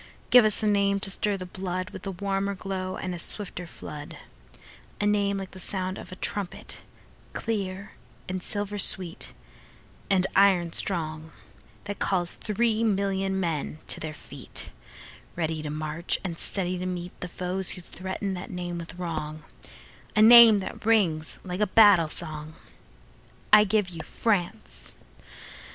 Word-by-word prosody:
Give 250 -3 +8
us 215 +1 +2
a - - +2
name 200 -1 +2
to 195 - +2
stir 205 +1 +2
the 185 - -6
bloodWith 185 +2 -5
a - - -1
warmer 195 +1 -2
glow 185 -1 -4
and 185 - -4
a 175 - -6
swifter 180 -1 -4
flood,—A 145 - -10
name 200 -1 +1
like 195 -1 -6
the 190 - -11
sound 185 0 -2
of - - -11
a - - -7
trumpet, 195 -1 -3 0.5
clear, 200 -3 -3 0.4
And 185 0 -3
silver 205 +2 -3
sweet, 180 -3 +2 0.8
and 190 -2 +3
iron 185 -4 +4
strong, 160 -3 +2 0.5
That 205 -1 -6
calls 175 -3 +1
three 220 +1 0
million 195 -2 0
men 160 -4 -2
to - - +3
their 155 - -5
feet, - - -5 0.6
Ready 160 -2 -2
to 150 - -5
march, 155 +3 -1
and 170 -4 -5
steady 180 -2 +1
to 180 - -3
meetThe 180 0 -6
foes 185 +1 -2
who 180 - -8
threaten 190 +3 -5
that 180 0 -6
name 175 -1 -5
with 170 +1 -8
wrong,—A 155 - -6
name 230 -2 +9
that - - -7
rings 185 -8 +1
like 180 0 -5
a 210 - +3
battle 195 -6 +6
song.I 155 - -2
give 205 -1 +1
you 165 -2 -7
France! 190 0 -2
185 Hz, 140 wpm, -26 LUFS, 170-200 Hz, 0.8 s, name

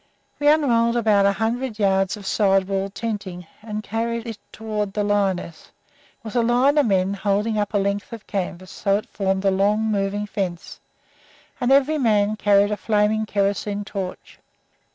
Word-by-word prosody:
We 290 - +1
unrolled 240 -6 +3
about 210 -4 +3
a - - +4
hundred 230 +2 -2
yards 195 -1 +1
of 200 - -11
side 195 -2 +2
wall 195 -1 0
wall 195 +1 -3
tenting, 200 -4 -5 0.2
and 215 -1 -5
carried 230 +2 -3
it 225 -3 -7
toward 210 -2 -4
the 210 - -1
lioness. 195 -5 -1 0.5
It - - -42
was 220 +1 -8
a 240 - +4
line 250 +5 +3
of 285 - +3
men, 190 -1 +1
holding 205 +2 0
up 205 0 -2
a - - +5
length 200 +2 -1
of 225 -4 -9
canvas 185 -1 -4
so 200 -1 0
that 210 - -1
it 245 - -27
formed 190 -1 -1
a 195 - +4
long, 210 +3 +1
moving 200 0 -1
fence. 190 -4 -5 0.8
And 250 +1 +1
every 280 +3 +4
man 215 -4 +2
carried 205 -1 +3
a 210 - -1
flaming 215 0 +1
kerosene 200 0 -1
torch. 190 -3 -7
205 Hz, 180 wpm, -22 LUFS, 195-225 Hz, 0.8 s, a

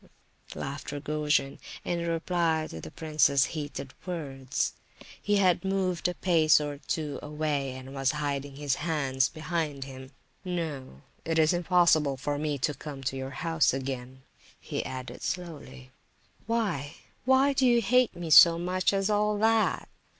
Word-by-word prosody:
laughed 140 +1 -5
Rogojin, 150 -1 -1 0.3
in 170 -1 -1
reply 165 -1 0
to 80 - -8
the 80 - -8
prince's 150 - +2
heated 145 -3 -5
words. 135 -7 -3 0.5
He 205 - +1
had 185 -3 +3
moved 190 -2 0
a 180 - -3
pace 160 -5 +4
or 145 -1 -4
two 150 -1 -3
away, 150 -3 -2
and 130 +1 -9
was 135 0 0
hiding 145 -2 -3
his 145 -1 -1
hands 140 -5 0
behind 155 -4 -3
him. 130 -1 -10 0.3
"No, 155 - -4 0.2
it 165 0 -1
is 160 +1 +4
impossible 170 -5 +3
for 145 +2 -2
me 150 -1 -1
to 145 +3 0
come 140 -1 -8
to 135 +1 -2
your 130 0 -4 0.2
house 165 -5 +2
again," 130 -1 -5 0.4
he - - -4
added 130 -1 -7
slowly. 145 -7 -6 0.6
"Why? 195 -11 -1 0.6
Do 265 -1 +3
you 240 -1 +5
hate 245 +3 +3
me 170 -2 -5
so 165 +2 +9
much 185 +3 0
as 195 0 +1
all 210 0 +1
that?" 220 +1 +2
155 Hz, 145 wpm, -28 LUFS, 135-175 Hz, 0.6 s, so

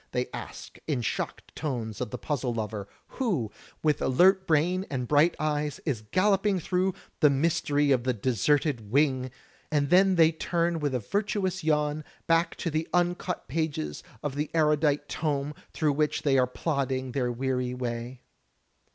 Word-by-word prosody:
they 125 0 -1
ask - - -8
in 145 -5 0
shocked 115 - -4
tones 115 -8 -4
of - - -2
the 125 - -5
puzzle 135 -4 -2
lover, 105 -2 -4 0.3
who, 170 - 0 0.3
with 150 -2 +2
alert 190 +8 +4
brain 170 +4 +2
and 125 -3 -3
bright 150 +5 +4
eyes, 150 -1 -1
is 135 -9 -1
galloping 195 - +2
through 185 +3 0 0.3
"The 150 - +6
Mystery 145 0 +2
of 125 -3 +3
the 130 - +1
Deserted 125 - 0
Wing," 130 0 +2 0.4
and 145 -2 +1
then 190 +1 +6
they 165 -2 +6
turn 170 +1 -1
with 145 -3 -1
a - - +1
virtuous 190 - -1
yawn, 150 -1 +1 0.2
back 165 0 +2
to 170 - -3
the 155 +2 -1
imcut 180 0 0
pages 140 - -2 0.2
of 145 -2 -2
the 145 +2 -2
erudite 150 -2 +2
tome 145 -2 -2 0.2
through 155 -3 +1
which 150 +1 0
they 140 -3 +3
are 130 -1 +4
plodding 130 -2 -2
their 125 -2 0
weary 125 0 -1
way. 120 0 -4
150 Hz, 160 wpm, -28 LUFS, 130-165 Hz, 0.4 s, The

